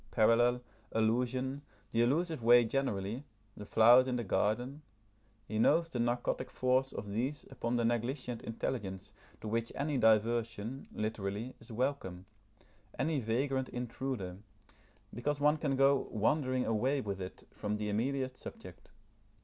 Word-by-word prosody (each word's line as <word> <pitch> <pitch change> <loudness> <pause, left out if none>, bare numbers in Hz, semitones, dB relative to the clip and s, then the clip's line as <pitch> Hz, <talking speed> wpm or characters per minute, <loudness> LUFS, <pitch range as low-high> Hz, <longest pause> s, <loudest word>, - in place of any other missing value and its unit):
Parallel, 120 +3 +4 0.3
allusion, 125 +5 0 0.3
the 115 - +2
allusive 155 +4 +1
way 120 +1 +7
generally, 110 -2 -2 0.3
the 105 - -9
flowers 120 +3 +7
in 125 - 0
the 120 - -1
garden: 120 +8 0 0.7
he 110 - -2
knows 165 +8 +4
the 125 - -4
narcotic 120 +2 0
force 130 +1 +1
of 100 - -6
these 130 +8 -2
upon 115 +1 -2
the 120 -1 +1
negligent 120 +1 -1
intelligence 105 -4 -4 0.3
to - - -6
which 115 +1 -1
any 145 -1 -1
diversion, 115 +2 +1
literally, 110 +2 -3
is 115 - -13
welcome, 110 -7 -2 0.7
any 155 -2 +1
vagrant 130 +3 0
intruder, 120 -6 -4 0.8
because 145 +5 -1
one 150 +2 +4
can 145 -3 0
go 135 0 +3
wandering 130 +3 +1
away 125 +6 +1
with 100 -5 -4
it 90 - -8
from 105 0 -2
the 105 0 -3
immediate 130 +5 -1
subject. 90 -7 -11
120 Hz, 135 wpm, -33 LUFS, 110-135 Hz, 0.8 s, way